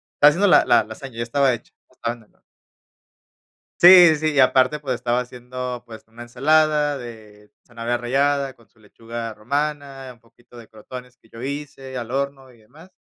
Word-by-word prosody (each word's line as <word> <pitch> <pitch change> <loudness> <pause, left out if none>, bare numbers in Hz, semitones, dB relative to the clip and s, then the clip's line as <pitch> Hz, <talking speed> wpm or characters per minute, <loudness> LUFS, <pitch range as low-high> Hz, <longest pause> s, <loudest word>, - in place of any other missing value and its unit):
Estaba 145 - +6
haciendo 185 +7 +1
la - - +5
la - - +4
lasaña, 115 +3 -11
ya 115 - -2
estaba 135 +2 +1
hecha, 115 - -9 0.2
estaba 120 -2 -5
en 115 - -19
el 105 - -31
horno. - - -35 1.4
Sí, 175 -2 +9
sí, 155 +1 -1
y 145 - -2
aparte, 130 +2 +3
pues, 135 -3 -3
estaba 120 0 -1
haciendo, 125 0 -7
pues, 110 -1 -13
una 115 +1 -13
ensalada 150 +4 +1
de 110 -4 -12 0.2
zanahoria 120 0 -3
rallada 135 +3 0
con 115 - -25
su - - -33
lechuga 115 +1 -8
romana, 140 +2 -4
un 120 - -27
poquito 120 +1 -22
de 115 -2 -13
crotones 125 +3 -11
que 115 - -27
yo 115 +1 -12
hice 135 -1 -7
al 120 0 -7
horno, 135 -1 -4
y 120 - -22
demás. 155 - -19
125 Hz, 185 wpm, -21 LUFS, 115-140 Hz, 1.4 s, Sí